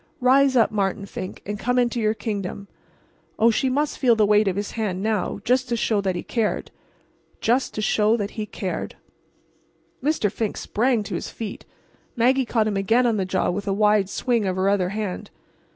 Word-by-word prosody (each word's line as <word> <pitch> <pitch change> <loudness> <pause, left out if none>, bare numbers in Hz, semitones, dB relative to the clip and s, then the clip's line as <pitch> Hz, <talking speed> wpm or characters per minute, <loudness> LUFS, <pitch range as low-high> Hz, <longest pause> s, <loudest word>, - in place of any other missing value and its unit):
Rise 265 +1 +4
up, 230 -3 +4
Martin 200 -1 -1
Fink, 185 -1 -7
and 205 0 -4
come 245 +2 0
into 240 -1 +1
your 215 -1 +1
kingdom! 200 -3 -4 0.7
Oh, 230 +1 +5
she 260 +4 +1
must 290 +3 -1
feel 245 -4 +4
the 215 -1 +3
weight 210 0 +4
of 190 - +1
his 205 +1 -3
hand 200 -4 -3
now—just 240 +4 0
to 240 - +1
show 215 -2 +1
that 190 -2 -1
he - - -4
cared—just 235 +2 -3
to 215 - -2
show 215 +2 +3
that 205 -2 -3
he 215 -1 -5
cared! 190 -2 -4 1.1
Mr. 280 -9 +1
Fink 220 -1 -3
sprang 235 0 0
to - - -7
his - - -4
feet—Maggie 245 +3 -3
caught 225 -2 +1
him 210 -2 -1
again 225 +6 +2
on 230 -3 +2
the 190 - 0
jaw 185 0 0
with 200 +3 -4
a 195 - +1
wide 210 -1 +3
swing 235 -2 0
of 185 - -1
her 190 +1 +1
other 190 -3 +1
hand. 205 -2 -4
215 Hz, 185 wpm, -23 LUFS, 200-240 Hz, 1.1 s, Oh